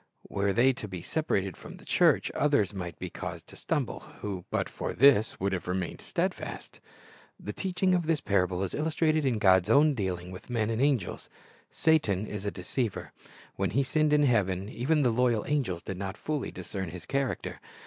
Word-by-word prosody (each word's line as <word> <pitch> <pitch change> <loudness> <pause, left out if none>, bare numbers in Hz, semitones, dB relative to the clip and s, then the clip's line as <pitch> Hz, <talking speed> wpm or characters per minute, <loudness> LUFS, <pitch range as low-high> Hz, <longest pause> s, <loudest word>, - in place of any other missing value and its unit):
Were 100 0 0
they 125 +6 +4
to 110 - -7
be 90 -3 -7
separated 100 - -1
from - - -11
the - - -16
church, - - +3
others 140 -9 +2
might 90 -3 -5
be 90 -1 -6
caused - - -6
to - - -12
stumble, - - -2 0.2
who 95 -4 -4
but - - 0
for - - -4
this 120 -4 +5
would 95 +1 0
have 90 - -3
remained 90 -1 -3
steadfast. - - -3 0.6
The 105 - -6
teaching 185 0 0
of 175 -3 +1
this 165 -2 +2
parable 95 -4 +1
is 95 - -3
illustrated 155 -1 +1
in 120 -4 +1
God's 95 -1 +4
own 145 +5 +5
dealing 90 -6 -3
with 90 - -10
men 115 -2 0
and 115 +2 -1
angels. 135 -9 0 0.4
Satan 110 - +2
is 105 -1 -5
a - - +3
deceiver. 105 +5 -3 0.5
When - - 0
he 140 - +2
sinned 155 +3 +1
in 150 0 +5
heaven, 100 -6 +1
even 145 +6 +1
the 125 - +3
loyal 120 -2 +2
angels 125 - -1
did 95 - -5
not 95 +2 -4
fully 150 -3 -2
discern 95 -4 -5
his 85 0 -8
character. 135 -2 -2
110 Hz, 190 wpm, -29 LUFS, 95-140 Hz, 0.6 s, this